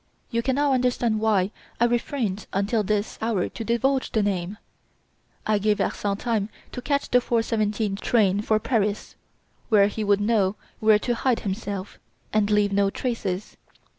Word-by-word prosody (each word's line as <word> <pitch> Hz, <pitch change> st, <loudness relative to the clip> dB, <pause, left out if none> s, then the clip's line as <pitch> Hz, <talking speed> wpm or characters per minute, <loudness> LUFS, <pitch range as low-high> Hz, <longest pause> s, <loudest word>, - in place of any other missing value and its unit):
You 230 Hz, -1 st, +1 dB
can 260 Hz, +2 st, 0 dB
now 285 Hz, -1 st, +2 dB
understand 245 Hz, -3 st, +1 dB
why 210 Hz, -3 st, +2 dB, 0.3 s
I 235 Hz, -, +5 dB
refrained 235 Hz, -4 st, -1 dB
until 200 Hz, +3 st, +1 dB
this 210 Hz, +1 st, -2 dB
hour 220 Hz, -5 st, 0 dB
to 225 Hz, -, -6 dB
divulge 255 Hz, +4 st, 0 dB
the 220 Hz, -4 st, +1 dB
name. 195 Hz, 0 st, -2 dB, 0.9 s
I 215 Hz, -1 st, +2 dB
gave 210 Hz, 0 st, +1 dB
Larsan 200 Hz, -1 st, -1 dB
time 220 Hz, -2 st, -1 dB, 0.2 s
to 250 Hz, -, -6 dB
catch 280 Hz, +2 st, -1 dB
the 250 Hz, -, +6 dB
4:17 215 Hz, -3 st, 0 dB
train 205 Hz, -4 st, +2 dB
for 215 Hz, 0 st, +2 dB
Paris, 210 Hz, -3 st, -1 dB, 0.6 s
where 210 Hz, -3 st, +6 dB
he 210 Hz, +2 st, -2 dB
would 205 Hz, -1 st, +3 dB
know 205 Hz, -2 st, +2 dB, 0.2 s
where 215 Hz, -1 st, +5 dB
to 240 Hz, +3 st, -1 dB
hide 240 Hz, 0 st, 0 dB
himself, 200 Hz, -1 st, -5 dB, 0.3 s
and 215 Hz, -1 st, +2 dB
leave 210 Hz, -1 st, +2 dB
no 200 Hz, 0 st, +3 dB
traces. 205 Hz, -5 st, -3 dB
215 Hz, 160 wpm, -24 LUFS, 200-235 Hz, 0.9 s, the